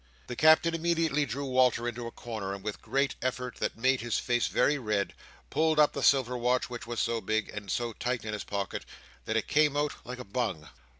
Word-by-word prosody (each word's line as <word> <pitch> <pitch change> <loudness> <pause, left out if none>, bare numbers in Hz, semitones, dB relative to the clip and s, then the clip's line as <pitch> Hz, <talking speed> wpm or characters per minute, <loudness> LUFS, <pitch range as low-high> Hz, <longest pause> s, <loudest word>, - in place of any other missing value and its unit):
The 125 - -6
Captain 160 +3 +5
immediately 165 -3 +1
drew 140 +4 -3
Walter 125 -2 +3
into 120 0 -4
a - - -7
corner, 110 -6 -5
and 100 - -11
with 105 -1 -3
a - - -30
great 140 -1 0
effort, 125 0 -3
that - - -2
made 130 +2 +2
his 120 -1 -1
face 120 -1 +1
very 145 0 +2
red, 105 -5 -1 0.4
pulled 155 +1 +2
up 150 - +5
the - - -3
silver 130 -3 +4
watch, 125 +1 +1
which 120 -1 -6
was 120 -1 -3
so 115 -1 0
big, 110 0 -1
and 105 -2 -7
so 120 +5 -1
tight 125 0 -2
in 105 - -3
his 105 - -3
pocket, 100 -2 -3 0.4
that - - 0
it - - -1
came 150 -1 +3
out 145 0 +1
like 125 +1 -7
a 125 - -8
bung. 100 -8 -2
125 Hz, 225 wpm, -29 LUFS, 110-140 Hz, 0.4 s, Captain